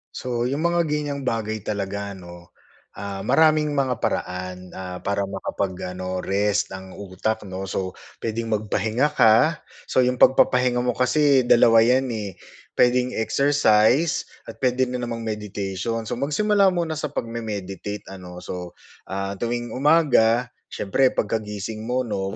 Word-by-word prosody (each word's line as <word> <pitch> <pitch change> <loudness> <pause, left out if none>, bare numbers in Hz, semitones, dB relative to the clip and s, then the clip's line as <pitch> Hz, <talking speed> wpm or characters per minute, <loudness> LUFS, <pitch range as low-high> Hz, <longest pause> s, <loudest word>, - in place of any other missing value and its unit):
So, 120 -1 -2
'yung 140 +4 -2
mga 170 -1 +2
ganyang 145 -2 -2
bagay 110 -1 -1
talaga 100 -1 -3
'no, 85 -1 -13 0.4
ah, 100 -1 -5
maraming 150 +5 +3
mga 130 -3 0
paraan, 90 0 -2 0.2
ah, 90 -1 -6
para 100 0 0
makapag-ano 95 -1 -4
rest 105 +1 0
ang 95 0 -9
utak 100 +3 -3
'no. 95 0 -6
So 95 -1 -2 0.3
pwedeng 115 0 -2
magpahinga 110 +5 0
ka, 125 +6 +4 0.3
so - - 0
'yung 125 0 +1
pagpapahinga 125 -1 +4
mo 125 - 0
kasi 135 +1 +3
dalawa 115 -1 +6
'yan 130 +2 +3
eh, 105 -4 -4 0.4
pwedeng 125 +1 +3
exercise 140 +3 +3 0.2
at - - -9
pwede 130 0 +2
na 125 0 -3
namang 115 -1 -4
meditation. 105 +1 -3
So - - -2
magsimula 200 +7 +3
muna 170 -2 -1
sa 150 -1 -3
pagme-meditate 105 -5 -5
ano. 90 -2 -10
So, 90 -1 -7 0.3
ah, 95 +1 -3
tuwing 120 +1 -3
umaga, 125 -5 +3 0.2
siyempre 125 +6 +1
pagkagising 105 -1 -3
mo 125 +1 0
'no, 95 -4 -3
115 Hz, 135 wpm, -23 LUFS, 100-130 Hz, 0.4 s, dalawa